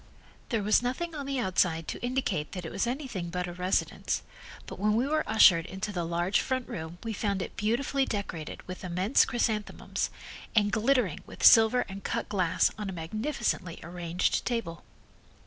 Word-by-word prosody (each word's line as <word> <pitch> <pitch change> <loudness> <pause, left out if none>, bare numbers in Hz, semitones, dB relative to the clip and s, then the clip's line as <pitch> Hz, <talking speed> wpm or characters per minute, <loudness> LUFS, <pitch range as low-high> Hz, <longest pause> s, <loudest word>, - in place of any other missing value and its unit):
There 225 -4 0
was 210 +3 +4
nothing 260 +8 -2
on 285 -3 -5
the 275 -1 -1
outside 180 -7 +1
to - - -5
indicate 245 - -1
that 180 -3 -5
it - - -5
was - - -1
anything 240 - -3
but 180 +1 -2
a 175 - -6
residence, 180 +2 -1 0.4
but - - -9
when 210 +1 +2
we 240 +3 +2
were 310 +2 +1
ushered 185 -6 +6
into 195 +3 -4
the 175 -4 -2
large 175 +4 +1
front 260 -1 -2
room, 160 +1 -6
we 225 -1 -3
found 200 -2 -1
it - - -5
beautifully 265 +5 +1
decorated 185 -7 -5
with 185 +1 -7
immense 185 +6 +3
chrysanthemums, 220 -3 -1 0.5
and 205 -1 +4
glittering 230 - +2
with - - -3
silver 225 +2 +8
and 195 0 -8
cut - - -2
glass 185 -4 +2
on 210 -2 -3
a - - -5
magnificently 185 - -2
arranged 170 +1 -1
table. 230 -9 -3
205 Hz, 175 wpm, -29 LUFS, 175-240 Hz, 0.5 s, silver